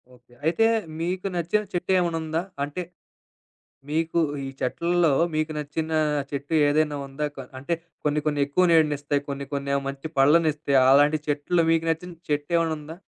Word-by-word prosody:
Okay. 125 Hz, 0 st, -24 dB
అయితే 170 Hz, +8 st, +3 dB, 0.3 s
మీకు 180 Hz, +3 st, -2 dB
నచ్చిన 175 Hz, +5 st, +1 dB
చెట్టు 180 Hz, +1 st, -1 dB
ఏమన్నా 170 Hz, -2 st, 0 dB
ఉందా? 160 Hz, +1 st, -1 dB, 0.2 s
అంటే? 145 Hz, +5 st, -4 dB, 1.1 s
మీకు 165 Hz, +2 st, 0 dB, 0.3 s
ఈ -, -, -4 dB
చెట్లలో 170 Hz, +4 st, +1 dB, 0.2 s
మీకు 155 Hz, 0 st, -1 dB
నచ్చిన 150 Hz, +2 st, -3 dB, 0.4 s
చెట్టు 140 Hz, +2 st, -5 dB, 0.2 s
ఏదైనా 150 Hz, 0 st, +1 dB
ఉందా? 140 Hz, +2 st, -4 dB
కొ -, -, -6 dB, 0.2 s
అంటే 155 Hz, +6 st, -1 dB, 0.3 s
కొన్ని, 150 Hz, 0 st, +1 dB
కొన్ని 145 Hz, -1 st, +1 dB
ఎక్కువ 165 Hz, +6 st, +2 dB
నీడినిస్తాయి. 145 Hz, -3 st, +2 dB
కొన్ని 140 Hz, 0 st, -4 dB
కొన్నేమో 140 Hz, 0 st, -1 dB
మంచి 140 Hz, +2 st, -6 dB
పళ్ళనిస్తాయి. 150 Hz, 0 st, +3 dB
అలాంటి 145 Hz, +3 st, +5 dB
చెట్లో 150 Hz, +4 st, +1 dB
మీకు 165 Hz, 0 st, +2 dB
నచ్చిన 175 Hz, +2 st, -3 dB, 0.2 s
చెట్టు 145 Hz, +1 st, -1 dB
ఏమన్నా 165 Hz, -1 st, +1 dB
ఉందా? 155 Hz, +2 st, -9 dB
155 Hz, 150 wpm, -25 LUFS, 145-165 Hz, 1.1 s, అలాంటి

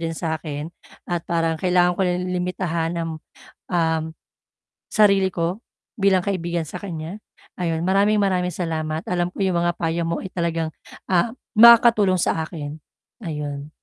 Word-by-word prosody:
din 165 Hz, -1 st, -3 dB
sa 160 Hz, -1 st, -2 dB
akin 150 Hz, 0 st, -5 dB, 0.3 s
at 175 Hz, -1 st, -2 dB
parang 165 Hz, -1 st, 0 dB
kailangan 180 Hz, -1 st, +3 dB
ko -, -, 0 dB
limitahan 180 Hz, -2 st, -1 dB
ang, 165 Hz, -1 st, -2 dB, 0.6 s
um, 160 Hz, -2 st, +2 dB, 0.9 s
sarili 200 Hz, -3 st, +4 dB
ko 175 Hz, +3 st, -2 dB, 0.4 s
bilang 195 Hz, -2 st, +3 dB
kaibigan 175 Hz, -4 st, -2 dB
sa 170 Hz, +4 st, -7 dB
kanya 170 Hz, +1 st, -6 dB, 0.4 s
ayun. 165 Hz, -1 st, -1 dB
Maraming 200 Hz, +3 st, +3 dB
maraming 185 Hz, -3 st, +1 dB
salamat 160 Hz, -2 st, -3 dB
alam 175 Hz, -1 st, 0 dB
ko -, -, -16 dB
'yong 185 Hz, -, +1 dB
mga 175 Hz, 0 st, +1 dB
payo 165 Hz, 0 st, -1 dB
mo 170 Hz, -, -1 dB
ay 190 Hz, -, -7 dB
talagang 165 Hz, -2 st, -1 dB, 0.3 s
ah, 185 Hz, +4 st, +2 dB, 0.2 s
makakatulong 225 Hz, -4 st, +7 dB
sa 165 Hz, -, +1 dB
akin, 155 Hz, -3 st, -6 dB, 0.5 s
ayun. 150 Hz, -4 st, -5 dB
175 Hz, 145 wpm, -22 LUFS, 165-185 Hz, 0.9 s, makakatulong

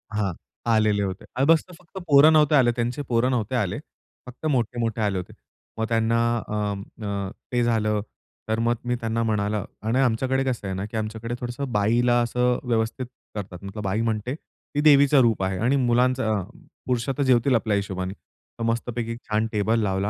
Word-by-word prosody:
हां, 100 Hz, -4 st, 0 dB, 0.4 s
आलेले 105 Hz, -2 st, +3 dB
होते 95 Hz, -1 st, -4 dB
आणि 135 Hz, +2 st, +2 dB
बस 165 Hz, -1 st, +5 dB
फक्त 180 Hz, +2 st, -15 dB
पोरं 145 Hz, +2 st, +7 dB
नव्हते 150 Hz, -1 st, +5 dB
आले, 120 Hz, -3 st, +5 dB
त्यांचे 120 Hz, +4 st, -2 dB
पोरं 120 Hz, +2 st, +2 dB
नव्हते 120 Hz, 0 st, -1 dB
आले. 105 Hz, -7 st, -1 dB, 0.5 s
फक्त 125 Hz, +5 st, -10 dB
मोठे-मोठे 120 Hz, -5 st, 0 dB
आले 100 Hz, -3 st, +1 dB
होते. 90 Hz, -, -6 dB, 0.4 s
मग 110 Hz, -, 0 dB
त्यांना 115 Hz, 0 st, +2 dB, 0.3 s
अ, -, -, -5 dB, 0.5 s
अ, 100 Hz, -1 st, -2 dB, 0.2 s
ते 120 Hz, -1 st, +2 dB
झालं, 110 Hz, -3 st, +1 dB, 0.5 s
तर 110 Hz, +1 st, +1 dB
मग 120 Hz, -, +3 dB
मी 125 Hz, 0 st, 0 dB
त्यांना 115 Hz, 0 st, -1 dB
म्हणाल 105 Hz, -1 st, 0 dB
आणि 110 Hz, +4 st, -2 dB
आमच्याकडे 130 Hz, +2 st, +1 dB
कसं 120 Hz, -6 st, -2 dB
आहे 95 Hz, -, -3 dB
ना 95 Hz, +2 st, -3 dB
की 110 Hz, +1 st, -6 dB
आमच्याकडे 110 Hz, +2 st, -4 dB
थोडंसं 125 Hz, +1 st, -4 dB
बाईला 120 Hz, +4 st, +3 dB
असं 125 Hz, +1 st, +1 dB
व्यवस्थित 120 Hz, +1 st, -1 dB, 0.3 s
करतात, 95 Hz, -3 st, -6 dB
मतलब 100 Hz, +2 st, -6 dB
बाई 100 Hz, +3 st, 0 dB
म्हणजे 115 Hz, +4 st, -1 dB, 0.4 s
ती 145 Hz, -, +2 dB
देवीचं 145 Hz, -2 st, +6 dB
रूप 115 Hz, -5 st, +2 dB
आहे 95 Hz, 0 st, -1 dB
आणि 125 Hz, +5 st, +2 dB
मुलांचं 125 Hz, 0 st, +2 dB
अ, 95 Hz, -, -1 dB, 0.4 s
पुरुष 125 Hz, -1 st, -1 dB
तर 140 Hz, +1 st, 0 dB
जेवतील 130 Hz, 0 st, +3 dB
आपल्या 110 Hz, -2 st, +1 dB
हिशोबाने. 95 Hz, -1 st, -3 dB, 0.5 s
तर -, -, -2 dB
मस्तपैकी 115 Hz, 0 st, -2 dB
छान 110 Hz, -1 st, -1 dB
टेबल 110 Hz, +2 st, +1 dB
लावला 95 Hz, 0 st, 0 dB
115 Hz, 180 wpm, -24 LUFS, 105-125 Hz, 0.5 s, पोरं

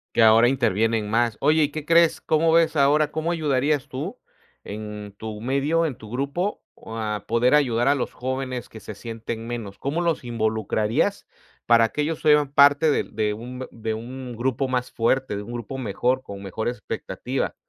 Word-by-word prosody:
Que -, -, +4 dB
ahora 115 Hz, +1 st, +7 dB
intervienen 115 Hz, -4 st, +1 dB
más. 115 Hz, 0 st, +1 dB
Oye, 155 Hz, +2 st, +4 dB
¿y 145 Hz, -, +1 dB
qué 155 Hz, 0 st, -5 dB
crees? 170 Hz, 0 st, +4 dB
¿Cómo 160 Hz, +1 st, +2 dB
ves 165 Hz, -1 st, +4 dB
ahora? 145 Hz, +1 st, +4 dB
¿Cómo 160 Hz, +2 st, -1 dB
ayudarías 145 Hz, -3 st, 0 dB
tú 160 Hz, -, -5 dB, 0.4 s
en 105 Hz, -1 st, -7 dB
tu 110 Hz, -1 st, -7 dB
medio, 140 Hz, +7 st, +1 dB
en 135 Hz, -, -5 dB
tu 110 Hz, 0 st, -12 dB
grupo, 140 Hz, +10 st, -2 dB, 0.2 s
a 110 Hz, -2 st, -4 dB
poder 120 Hz, +4 st, +3 dB
ayudar 120 Hz, -4 st, +2 dB
a 140 Hz, -, +5 dB
los 135 Hz, -, -3 dB
jóvenes 130 Hz, -2 st, -4 dB
que 110 Hz, -, -11 dB
se -, -, -8 dB
sienten 115 Hz, 0 st, -6 dB
menos? 115 Hz, -5 st, -6 dB
¿Cómo 150 Hz, +5 st, -1 dB
los 170 Hz, -4 st, 0 dB
involucrarías 110 Hz, -2 st, 0 dB, 0.4 s
para 115 Hz, -1 st, +5 dB
que 150 Hz, -, -2 dB
ellos 155 Hz, +1 st, -3 dB
sean 150 Hz, -2 st, +4 dB
parte 145 Hz, +2 st, +6 dB
del -, -, -2 dB
de 105 Hz, -1 st, 0 dB
un 125 Hz, +4 st, -7 dB
de 110 Hz, -1 st, -3 dB
un 125 Hz, +2 st, -7 dB
grupo 130 Hz, +3 st, -1 dB
más 125 Hz, -1 st, -2 dB
fuerte, 130 Hz, 0 st, 0 dB
de 100 Hz, -, -4 dB
un 110 Hz, +3 st, -9 dB
grupo 120 Hz, +3 st, -5 dB
mejor, 125 Hz, +3 st, 0 dB
con 100 Hz, -5 st, -9 dB
mejor 100 Hz, +3 st, -4 dB
expectativa? 120 Hz, -4 st, -3 dB
125 Hz, 180 wpm, -24 LUFS, 110-145 Hz, 0.4 s, ahora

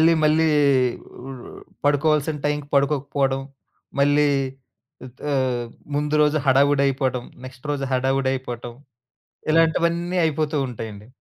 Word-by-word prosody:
అల్లి 165 Hz, +1 st, +6 dB
మళ్ళీ 155 Hz, +1 st, +4 dB, 0.8 s
ఆహ్, 130 Hz, -3 st, -9 dB, 0.3 s
పడుకోవాల్సిన 150 Hz, +1 st, +2 dB
టైంకి 145 Hz, 0 st, -1 dB
పడుకోకపోవడం 140 Hz, -1 st, +1 dB, 0.6 s
మళ్ళీ 145 Hz, +1 st, +4 dB, 1.0 s
ఆహ్, 130 Hz, -3 st, 0 dB, 0.3 s
ముందు 150 Hz, +1 st, 0 dB
రోజు 150 Hz, +1 st, +3 dB
హడావిడైపోవడం, 135 Hz, -2 st, +2 dB, 0.2 s
నెక్స్ట్ 130 Hz, 0 st, -11 dB
రోజు 140 Hz, -2 st, -1 dB
హడావిడయిపోవటం 130 Hz, -2 st, -1 dB, 0.8 s
ఇలాంటివన్నీ 170 Hz, +2 st, +2 dB
అయిపోతూ 155 Hz, 0 st, -1 dB
ఉంటాయండి. 110 Hz, -3 st, -8 dB
140 Hz, 90 wpm, -23 LUFS, 130-150 Hz, 1.0 s, అల్లి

